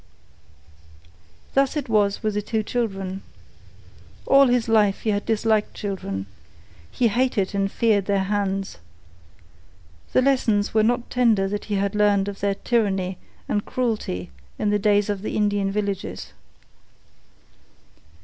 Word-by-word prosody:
Thus 275 +2 +2
it 290 - -3
was 210 -1 +1
with 215 -1 0
the 210 - -1
two 220 +1 -2
children. 195 -5 -3 1.0
All 275 0 +6
his 245 -2 +1
life 210 -3 +3
he 220 - 0
had 205 0 -2
disliked 220 -1 +1
children. 100 - -4 0.6
He 235 - +1
hated 220 -4 0
and 195 0 0
feared 215 -5 +2
their 200 -1 +1
hands. 195 - -2 1.3
The 255 - +4
lessons 230 -7 +1
were 220 - +4
not 240 +2 0
tender 225 -6 +3
that 205 +1 -4
he 210 - -2
had 200 0 0
learned 205 -1 +2
of 200 -1 -6
their 200 0 0
tyranny 195 -6 0 0.3
and 205 - 0
cruelty 215 - -3 0.3
in 210 - 0
the 205 - +2
days 205 0 +2
of 205 -2 -2
the 215 - -4
Indian 205 -2 +1
villages. 200 -1 -4
205 Hz, 135 wpm, -23 LUFS, 195-225 Hz, 1.3 s, All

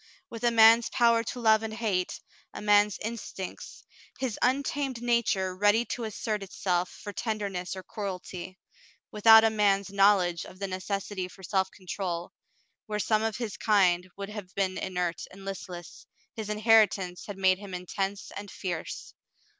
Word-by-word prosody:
With 230 0 -8
a 240 - +5
man's 230 0 +6
power 235 -2 +3
to 245 - -5
love 220 -2 +4
and 220 -1 -5
hate, 205 -6 -1 0.4
a - - -5
man's 205 -1 +4
instincts, 215 -4 -6 0.3
his 255 -5 -3
untamed 270 0 0
nature 230 -6 +1
ready 205 +4 +3
to 240 - -4
assert 215 0 -3
itself 180 -2 -1
for 205 - -9
tenderness 200 -6 -3
or 190 - -7
cruelty, 185 -2 -6 0.5
without 220 +1 +8
a 225 - +4
man's 200 -2 +2
knowledge 195 -4 +3
of 185 - -12
the 200 - -3
necessity 190 0 -3
for 190 +1 -15
self 190 0 0
control, 180 -2 -5 0.5
where 210 -1 -2
some 215 +1 +1
of 220 -1 -1
his 230 -5 -4
kind 185 -4 +3
would 200 0 -5
have 210 -3 -8
been 190 -1 0
inert 180 -2 -2
and 195 +1 -13
listless, 180 -3 -8 0.3
his 220 -2 -6
inheritance 210 -4 +3
had 205 -2 -6
made 190 -1 +3
him 200 -3 -7
intense 195 +2 -4
and 205 0 -7
fierce. 175 -4 -5
200 Hz, 155 wpm, -28 LUFS, 185-220 Hz, 0.5 s, without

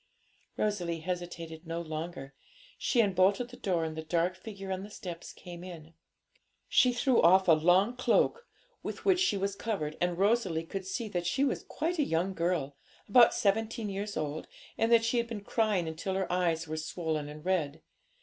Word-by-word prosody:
Rosalie 175 -6 -1
hesitated 170 -2 -5
no 165 +1 -3
longer. 155 -4 -6 0.5
She 240 - +3
unbolted 195 +4 +2
the 245 - -11
door, 180 -7 0
and 160 -1 -4
the 160 - -4
dark 170 +3 0
figure 195 0 -8
on 190 0 -2
the 205 - -8
steps 175 -5 -7
came 175 -1 -10
in. 165 -3 -10 0.7
She 250 - +5
threw 245 0 +3
off 185 +3 +6
a - - +7
long 180 +9 +4
cloak 255 - +2 0.3
with - - -6
which 375 -2 +4
she 360 - +2
was 195 +1 -1
covered; 175 -10 -3
and 175 -1 +1
Rosalie 195 -5 +1
could 190 +2 -5
see 230 +4 -3
that 175 -3 -2
she 265 +10 +1
was 280 - 0
quite 335 +2 -3
a - - +4
young 180 -3 0
girl, 165 -5 -1 0.3
about 235 +3 +6
seventeen 220 +1 0
years 200 +1 -4
old, 155 0 -3 0.3
and 225 +1 +1
that 230 -1 +6
she 230 +2 +1
had 235 0 +1
been 220 -3 -6
crying 205 -5 +1
until 160 +4 -3
her 190 -2 -1
eyes 165 -3 +1
were 155 +1 -4
swollen 155 -2 -3
and 150 +2 -10
red. 160 -5 -1
185 Hz, 185 wpm, -30 LUFS, 165-215 Hz, 0.7 s, a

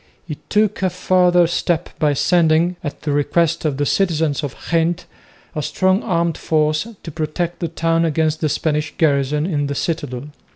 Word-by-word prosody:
He 150 -4 -6
took 210 -1 +1
a 190 - +2
further 180 -1 +3
step 170 0 -1
by 150 -2 +3
sending, 170 +3 +2
at 145 -1 -6
the 150 - -1
request 155 +3 +1
of 145 -3 0
the 145 - 0
citizens 160 -5 +1
of 140 - -4 0.2
Ghent, 170 +1 +1 0.5
a 155 - -2
strong 185 +6 +1
armed 170 -5 -1
force 155 +4 +1 0.2
to 165 - -7
protect 165 +3 -3
the 170 - -1
town 165 +1 0
against 155 -1 0
the 155 - +1
Spanish 150 +1 -1
garrison 150 -1 +1
in 145 -5 -1
the 140 - -3
citadel. 145 -4 -3
160 Hz, 170 wpm, -19 LUFS, 150-175 Hz, 0.5 s, further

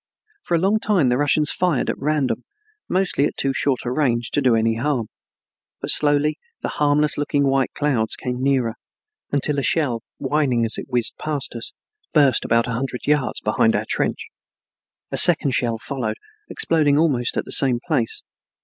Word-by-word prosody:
For 175 - -1
a - - +2
long 200 +5 +2
time 195 -12 +2
the 125 - +1
Russians 150 +1 +2
fired 180 -7 0
at - - -2
random, 145 -2 -1 0.5
mostly 185 -6 +1
at - - -4
too 135 0 0
short 135 -1 0
a 120 - -2
range 120 -4 0
to 145 - +1
do 125 -4 +3
any 115 0 +1
harm, 125 -3 -1 0.7
but - - -1
slowly 145 0 +1 0.2
the - - -3
harmless 150 0 +1
looking 145 -1 +1
white 135 -1 +1
clouds 130 -7 0
came 125 0 -4
nearer, 130 -4 +1 0.6
until 145 +1 0
a - - 0
shell, 130 -6 0 0.2
whining 135 -6 0
as 115 - -1
it - - -8
whizzed 120 -3 -2
past 150 -3 -3
us, 115 -1 -6 0.4
burst 140 -5 +4
about 115 0 +2
a 125 - -4
hundred 125 +1 -4
yards 150 -3 +1
behind - - +2
our - - -1
trench. - - -1 0.9
A - - -2
second 165 -5 +6
shell 120 -3 0
followed, 115 -2 -4 0.3
exploding 150 -3 +2
almost 140 -7 +1
at - - -1
the - - -10
same 130 -3 +3
place. 140 -10 0
140 Hz, 175 wpm, -21 LUFS, 120-150 Hz, 0.9 s, second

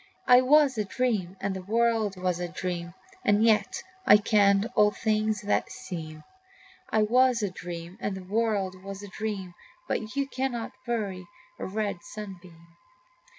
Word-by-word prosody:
I 250 0 +8
was 275 -2 +4
a - - +2
dream, 200 -5 -1
and 195 0 -2
the 190 - -5
world 220 -1 +1
was 180 -1 0
a 175 - -2
dream, 175 0 -4 0.3
And 205 +1 +3
yet 220 -2 +2 0.2
I 210 - +8
kenned 205 -1 +3
all 210 0 +6
things 215 -1 0
that 205 - 0
seem. 155 -4 -7 0.7
I 215 -1 +3
was 245 +1 +3
a 200 - -1
dream, 175 0 -7
and 200 -1 -2
the 190 - -8
world 195 -2 -1
was 195 +1 -7
a - - -7
dream, 205 -3 -4 0.3
But 220 +4 -3
you 280 -1 0
cannot 255 -4 -3 0.2
bury 200 -6 -2 0.3
a - - -4
red 205 -1 -2
sunbeam. 180 -5 -10
205 Hz, 155 wpm, -27 LUFS, 185-225 Hz, 0.7 s, I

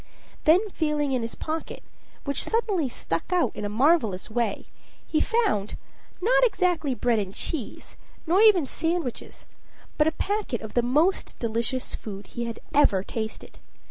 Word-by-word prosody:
Then 355 +7 +5
feeling 300 -4 0
in 255 -2 +1
his 230 0 -5
pocket, 315 +1 -5 0.4
which 280 -1 0
suddenly 410 - 0
stuck 165 - -4
out 360 -2 +2
in 210 - -4
a - - -2
marvelous 225 - +2
way, 230 -3 -1 0.4
he 310 - +1
found, 425 - +1 0.4
not 460 +7 +3
exactly 360 - +1
bread 240 -2 +1
and 195 -1 -4
cheese, 275 -10 -5 0.3
nor 355 +5 +4
even 410 -8 +6
sandwiches, 325 -3 -3 0.5
but 300 - +5
a - - +3
packet 405 - -2
of 220 - -8
the 240 - +3
most 300 +10 +1
delicious 230 +2 -2
food 200 -2 -7
he 235 +5 -5
had 230 -1 -5
ever 245 -10 +4
tasted. 220 +1 -6
285 Hz, 150 wpm, -26 LUFS, 230-350 Hz, 0.5 s, even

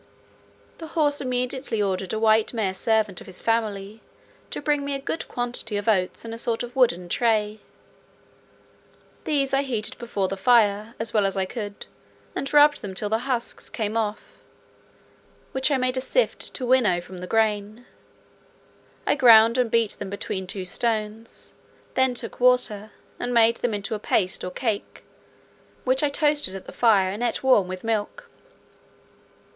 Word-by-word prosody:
The 325 - -7
horse 290 -2 +2
immediately 250 -2 -2
ordered 190 -2 -1
a 220 - -1
white 220 +1 +3
mare 200 -4 0
servant 215 -1 0
of - - -12
his 185 -1 -4
family 215 -2 -1 0.5
to - - -4
bring 295 -1 0
me 280 0 -2
a - - -3
good 300 +4 -4
quantity 240 -3 -3
of 205 - -5
oats 190 -1 +1
in 225 - -6
a 230 - -6
sort 230 0 -1
of 245 +1 -8
wooden 180 -9 +2
tray. 215 +1 +1 1.7
These 275 -3 0
I 270 - +4
heated 235 -6 -3
before 210 -5 -2
the 195 - -3
fire, 215 0 +3
as 225 0 -2
well 210 -3 +3
as 195 - -2
I 190 - +1
could, 205 0 -6 0.5
and 275 - -3
rubbed 295 0 +5
them 195 -2 -7
till 205 +2 -2
the 225 +5 -1
husks 240 -2 -3
came 215 -1 -3
off, 215 -2 -3 1.1
which 265 +2 +1
I 280 - +2
made 255 0 0
a - - 0
shift - - 0
to 255 - -3
winnow 240 -8 +3
from 180 +1 -10
the 180 - -7
grain. 215 +1 0 1.2
I - - +3
ground 230 -3 +6
and 245 -2 +2
beat 230 -2 +2
them 200 - -5
between 190 -1 -4
two 185 0 -4
stones; 220 +2 -3 0.4
then 260 -1 +2
took 235 -1 -4
water, 245 -4 +3 0.3
and 245 0 -2
made 230 0 +5
them 235 -3 -1
into 205 +1 -4
a 215 - -3
paste 190 -2 0
or 180 - -3
cake, 215 +2 -3 0.8
which 260 +1 +1
I 295 - +2
toasted 295 - 0
at 195 - -8
the - - -9
fire 200 -6 +3
and 205 +4 -6
eat 240 0 -1
warm 255 -8 +4
with 185 0 -6
milk. 225 - -2
225 Hz, 170 wpm, -24 LUFS, 205-250 Hz, 1.7 s, ground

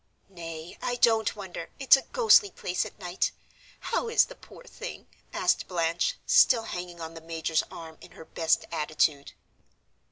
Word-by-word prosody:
"Nay, 165 -2 -9
I 245 - -1
don't 225 -2 +3
wonder, 190 -5 -7
it's 270 -1 +7
a 270 - -2
ghostly 450 - +4
place 180 - -3
at - - -15
night. 180 -3 -2 0.6
How 475 0 0
is 455 - +4
the - - -12
poor - - -15
thing?" - - -9 0.3
asked - - 0
Blanche, 170 -1 0
still 260 - +5
hanging 175 -4 -6
on 165 0 -7
the 165 - -10
major's 160 -1 -1
arm 160 -1 -10
in - - -14
her 160 - -12
best 160 0 0
attitude. 150 -2 0
175 Hz, 160 wpm, -27 LUFS, 165-230 Hz, 0.6 s, it's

